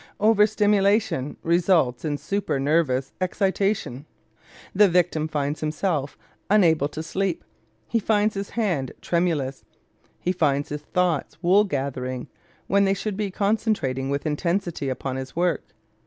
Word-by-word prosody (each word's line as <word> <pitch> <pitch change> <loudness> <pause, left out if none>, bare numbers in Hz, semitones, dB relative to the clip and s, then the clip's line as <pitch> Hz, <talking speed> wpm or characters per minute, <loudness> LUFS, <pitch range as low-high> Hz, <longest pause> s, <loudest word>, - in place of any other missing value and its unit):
Over 210 0 +5
stimulation 205 - +1
results 165 -7 +2
in 150 -2 -1
super 195 -4 -2
nervous 135 -2 +1
excitation. 190 - -1 0.7
The 205 +1 +6
victim 170 -3 +1
finds 145 -1 -2
himself 155 -2 -2 0.3
unable 165 -8 +4
to 155 +1 -6
sleep, 190 +1 -2 0.4
he 230 - +1
finds 210 0 +2
his 195 0 -4
hand 175 - -1
tremulous, 160 -6 -1 0.6
he 180 - 0
finds 145 -5 +1
his 150 0 -4
thoughts 175 -1 -1
wool 195 +4 +5
gathering 130 -6 -3 0.4
when 200 0 +3
they 195 0 +2
should 205 +1 -3
be 205 0 -2
concentrating 200 - 0
with 140 +2 -2
intensity 170 -1 -1
upon 130 0 -3
his 130 0 -7
work. 175 0 0
170 Hz, 130 wpm, -24 LUFS, 140-200 Hz, 0.7 s, The